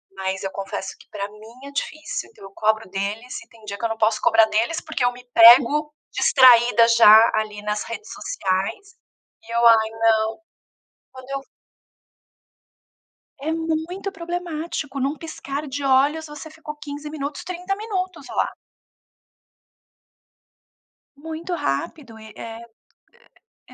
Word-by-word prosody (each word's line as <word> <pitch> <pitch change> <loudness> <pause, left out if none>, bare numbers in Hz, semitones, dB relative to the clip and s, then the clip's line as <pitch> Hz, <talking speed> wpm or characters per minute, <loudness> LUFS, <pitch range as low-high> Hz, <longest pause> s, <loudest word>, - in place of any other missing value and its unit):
mas 190 0 -3
eu 195 - -3
confesso 195 0 -5
que - - -18
pra 200 -1 -5
mim 225 +6 -14
é - - -10
difícil, 310 +2 -4
então 445 - -18
eu 195 - -12
cobro 220 0 0
deles 205 +6 -4
e - - -18
tem 225 -1 -20
dia 200 -1 -6
que 230 - -2
eu - - 0
não 225 - -4
posso 215 0 +1
cobrar 225 -1 +5
deles, 225 +9 0
porque 315 -5 -3
eu 245 - +3
me 245 0 -14
pego 265 +6 +7 0.2
distraída 240 -3 +6
já, 225 -1 +7
ali, 215 -1 -3
nas 210 0 -2
redes 230 - -8
sociais, 390 - -3 0.5
e 225 - -12
eu: 235 - +3
"Ai, 220 -1 +5
não", 225 0 +1 0.8
quando 260 0 -12
eu 275 - -2
v 275 - -19 2.0
É 315 +3 -2
muito 330 +4 -3
problemático, 335 -5 -5
num 275 +2 0
piscar 305 -2 -6
de 280 +1 -5
olhos 285 +4 +2
você 300 +1 -10
ficou 315 -1 -9
15 295 0 -8
minutos, 290 -1 -5
30 365 +2 -4
minutos 370 -8 -4
lá. - - 0 2.7
Muito 320 +4 -6
rápido, 225 - -4
e 220 0 -12
eh, 225 0 -8 1.1
e - - -17
260 Hz, 145 wpm, -22 LUFS, 220-315 Hz, 2.7 s, pego